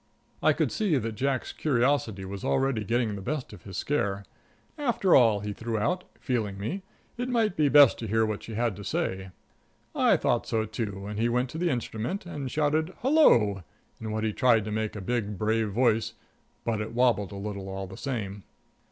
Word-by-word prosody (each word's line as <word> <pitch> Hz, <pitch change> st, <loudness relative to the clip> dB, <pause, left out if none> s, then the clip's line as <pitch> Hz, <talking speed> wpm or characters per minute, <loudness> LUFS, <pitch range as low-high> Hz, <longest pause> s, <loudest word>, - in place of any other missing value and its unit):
I -, -, +5 dB
could -, -, 0 dB
see 200 Hz, -9 st, +1 dB
that 115 Hz, -2 st, -2 dB
Jack's 130 Hz, +3 st, -2 dB
curiosity 125 Hz, -7 st, +1 dB
was 100 Hz, 0 st, -7 dB
already 135 Hz, -5 st, +1 dB
getting 115 Hz, 0 st, 0 dB
the 100 Hz, -, -6 dB
best 135 Hz, +2 st, -4 dB
of -, -, -13 dB
his 95 Hz, -2 st, -7 dB
scare. 100 Hz, -9 st, -1 dB, 0.5 s
After 240 Hz, -, +2 dB
all, 110 Hz, -5 st, +5 dB
he 105 Hz, 0 st, -4 dB
threw 115 Hz, +2 st, -3 dB
out, 180 Hz, -, 0 dB
feeling 110 Hz, -6 st, -2 dB
me, 115 Hz, -, -3 dB, 0.4 s
it 245 Hz, +1 st, -2 dB
might 225 Hz, -6 st, +1 dB
be 150 Hz, -2 st, +3 dB
best 145 Hz, -3 st, +7 dB
to 115 Hz, -, -4 dB
hear 110 Hz, +2 st, +2 dB
what 110 Hz, -1 st, -3 dB
she 115 Hz, -, -8 dB
had 115 Hz, -2 st, 0 dB
to 100 Hz, -, -8 dB
say. 95 Hz, -1 st, -2 dB, 0.6 s
I -, -, +4 dB
thought -, -, 0 dB
so, 110 Hz, -1 st, 0 dB
too, 105 Hz, -3 st, -4 dB
and 105 Hz, +1 st, -5 dB
he 115 Hz, +1 st, +2 dB
went 125 Hz, +2 st, 0 dB
to 160 Hz, -, -5 dB
the 175 Hz, 0 st, +1 dB
instrument 125 Hz, -, -3 dB
and 145 Hz, -6 st, -5 dB
shouted 155 Hz, +5 st, 0 dB
"Hello!" 120 Hz, -, +5 dB, 0.4 s
in 110 Hz, -, -5 dB
what 110 Hz, 0 st, -2 dB
he 110 Hz, -1 st, 0 dB
tried 115 Hz, -4 st, +3 dB
to 105 Hz, -, -4 dB
make 110 Hz, 0 st, -2 dB
a 105 Hz, -, -5 dB
big, 105 Hz, -1 st, -2 dB
brave 110 Hz, +1 st, +1 dB
voice, 115 Hz, +1 st, +1 dB, 0.5 s
but 110 Hz, -2 st, -1 dB
it 110 Hz, +2 st, -6 dB
wobbled 120 Hz, -6 st, +2 dB
a -, -, -7 dB
little 100 Hz, -1 st, -5 dB
all 95 Hz, 0 st, -4 dB
the 95 Hz, 0 st, -10 dB
same. 105 Hz, -7 st, -4 dB
115 Hz, 200 wpm, -27 LUFS, 105-135 Hz, 0.6 s, best